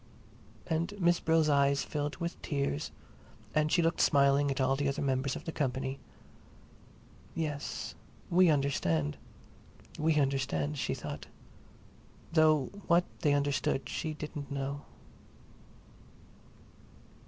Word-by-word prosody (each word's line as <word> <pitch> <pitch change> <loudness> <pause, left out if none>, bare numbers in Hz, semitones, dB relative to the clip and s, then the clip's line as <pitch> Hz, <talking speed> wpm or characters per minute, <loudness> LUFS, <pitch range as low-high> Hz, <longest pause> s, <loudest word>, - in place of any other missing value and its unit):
And 170 +6 -2
Miss 175 -1 +3
Brill's 160 -1 +3
eyes 140 -1 +3
filled 145 -1 -3
with 170 0 -5
tears 140 - -1 0.6
and 155 0 +2
she 170 - +4
looked 165 +1 +1
smiling 140 0 +4
at 135 - -2
all 135 0 +3
the 140 +1 0
other 140 0 -1
members 135 0 0
of - - -8
the 165 - -3
company. 130 -2 -2 1.4
Yes, 150 -3 -3 0.3
we 180 0 +5
understand, 85 - +1 0.8
we 155 +1 +2
understand, 130 - 0
she - - -1
thought—though 155 -4 -2 0.2
what 175 +1 +4
they 145 -3 +3
understood 140 -1 0
she 155 -2 -3
didn't 150 -2 -6
know. 140 0 -3
145 Hz, 110 wpm, -31 LUFS, 135-160 Hz, 1.4 s, we